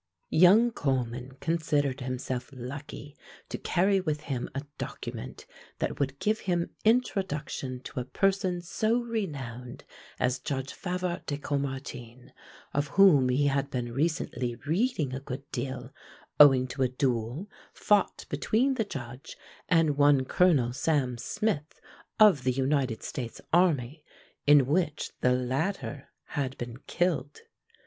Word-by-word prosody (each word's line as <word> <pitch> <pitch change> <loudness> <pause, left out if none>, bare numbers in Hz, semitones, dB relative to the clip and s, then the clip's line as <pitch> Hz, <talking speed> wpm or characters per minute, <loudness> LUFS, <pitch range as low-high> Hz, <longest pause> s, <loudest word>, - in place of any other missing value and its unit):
Young 205 +8 +6
Coleman 130 - -2
considered 150 -5 0
himself 130 0 -4
lucky 140 +3 -8 0.3
to - - -3
carry 190 +2 +2
with 155 -4 -2
him 135 -5 -3
a 140 - -2 0.2
document - - -6 0.3
that - - -3
would 135 -1 -1
give 215 +8 0
him 175 -2 -1
introduction 170 - 0
to 130 - -6
a - - -2
person 190 +2 0
so 215 +6 +1
renowned 140 - -5 0.4
as 125 0 +1
Judge 135 -2 -4
Favart 180 -1 -3
de 145 - -2
Caumartin, 135 -4 -5 0.4
of 145 +1 0
whom 155 -10 +7
he 135 +3 +2
had 140 0 +1
been 120 -3 -3
recently 130 -5 -1
reading 165 - 0
a 130 - -3
good 135 0 -6
deal 130 0 -4 0.5
owing 135 -3 +8
to 135 +2 -5
a 130 - +4
duel 125 - -1 0.2
fought 205 -1 +1
between 255 +5 +1
the 235 - 0
Judge 130 -3 -8 0.3
and 160 -4 +3
one 145 -2 +5
Colonel 135 -7 +3
Sam 130 -2 +1
Smith, 155 - -2 0.4
of 200 -11 +6
the 130 - +2
United 130 -2 0
States 120 -4 -5
army, 155 -5 +2 0.4
in 145 -2 +7
which 155 +1 0
the 125 - +4
latter 135 +4 -2 0.2
had 135 -2 -3
been 120 -1 -6
killed. 160 -6 -1
140 Hz, 130 wpm, -28 LUFS, 130-175 Hz, 0.5 s, owing